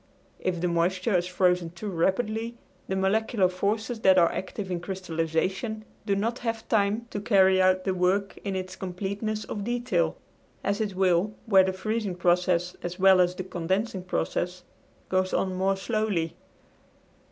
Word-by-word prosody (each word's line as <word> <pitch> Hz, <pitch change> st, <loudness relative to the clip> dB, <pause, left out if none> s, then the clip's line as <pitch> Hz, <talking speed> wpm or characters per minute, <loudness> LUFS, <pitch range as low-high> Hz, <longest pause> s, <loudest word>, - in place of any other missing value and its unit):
If 180 Hz, -2 st, -1 dB
the 180 Hz, -, 0 dB
moisture 180 Hz, +4 st, +1 dB
is 175 Hz, 0 st, +1 dB
frozen 180 Hz, -2 st, +2 dB
too 185 Hz, +5 st, -6 dB
rapidly 215 Hz, +6 st, 0 dB, 0.3 s
the 190 Hz, -, -1 dB
molecular 195 Hz, +1 st, +2 dB
forces 215 Hz, +6 st, -2 dB
that 190 Hz, -3 st, +5 dB
are 170 Hz, -2 st, +5 dB
active 190 Hz, 0 st, -5 dB
in 175 Hz, -, -1 dB
crystallization 185 Hz, +4 st, -2 dB, 0.2 s
do 200 Hz, -, +2 dB
not 230 Hz, +5 st, -1 dB
have 230 Hz, -2 st, -3 dB
time 215 Hz, +2 st, +1 dB
to 205 Hz, -, -3 dB
carry 190 Hz, -3 st, +4 dB
out 185 Hz, 0 st, +3 dB
the 190 Hz, -, 0 dB
work, 185 Hz, +2 st, +1 dB
in 195 Hz, -2 st, -2 dB
its 185 Hz, 0 st, -4 dB
completeness 200 Hz, +4 st, -3 dB
of 205 Hz, -, -5 dB
detail, 225 Hz, -8 st, 0 dB, 0.5 s
as 200 Hz, +2 st, 0 dB
it 205 Hz, -3 st, -2 dB
will 190 Hz, +2 st, +2 dB
where 195 Hz, -4 st, +6 dB
the 190 Hz, -, 0 dB
freezing 210 Hz, 0 st, -2 dB
process, 180 Hz, 0 st, +1 dB
as 175 Hz, +1 st, -5 dB
well 190 Hz, -1 st, +6 dB
as 180 Hz, 0 st, +2 dB
the 185 Hz, -, -4 dB
condensing 190 Hz, +3 st, -2 dB
process, 180 Hz, 0 st, -2 dB, 0.4 s
goes 185 Hz, 0 st, +1 dB
on 190 Hz, -1 st, 0 dB
more 190 Hz, +1 st, +1 dB
slowly. 200 Hz, -6 st, -1 dB
190 Hz, 160 wpm, -27 LUFS, 180-210 Hz, 0.5 s, where